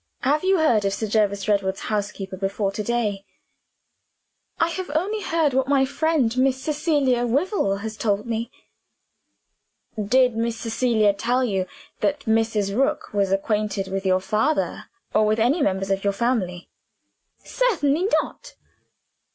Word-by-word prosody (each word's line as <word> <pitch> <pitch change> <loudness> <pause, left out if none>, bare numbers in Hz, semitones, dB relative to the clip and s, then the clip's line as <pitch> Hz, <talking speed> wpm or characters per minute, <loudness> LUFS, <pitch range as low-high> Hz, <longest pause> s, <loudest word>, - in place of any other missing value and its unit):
Have 295 +4 +1
you 380 0 +3
heard 240 -10 +3
of 195 0 0
Sir 220 - -3
Jervis 205 -2 0
Redwood's 195 -2 0
housekeeper 200 -2 -3
before 195 +1 -2
to 205 - -4
day?" 210 -3 -1 1.4
"I 330 - +3
have 365 0 -5
only 410 +7 0
heard 325 -6 +1
what 265 0 +1
my 275 -1 +3
friend 280 -4 0
Miss 260 0 +2
Cecilia 290 -5 +1
Wyvil 255 - 0
has 220 0 -6
told 210 -2 0
me." 230 0 -3 1.5
"Did 250 +3 +3
Miss 230 0 -1
Cecilia 225 -3 +1
tell 245 +5 0
you 195 -6 -1 0.3
that 290 0 0
Mrs. 220 -4 0
Rook 270 -2 0
was 200 -2 +1
acquainted 200 0 -1
with 195 0 -3
your 185 -1 +2
father 280 +10 0 0.3
or - - +4
with 215 +1 +1
any 260 +9 +2
members 195 -4 0
of 195 0 0
your 200 0 +1
family?" 200 -6 -1 0.8
"Certainly 350 - +1 0.2
not!" - - -12
225 Hz, 145 wpm, -23 LUFS, 200-275 Hz, 1.5 s, or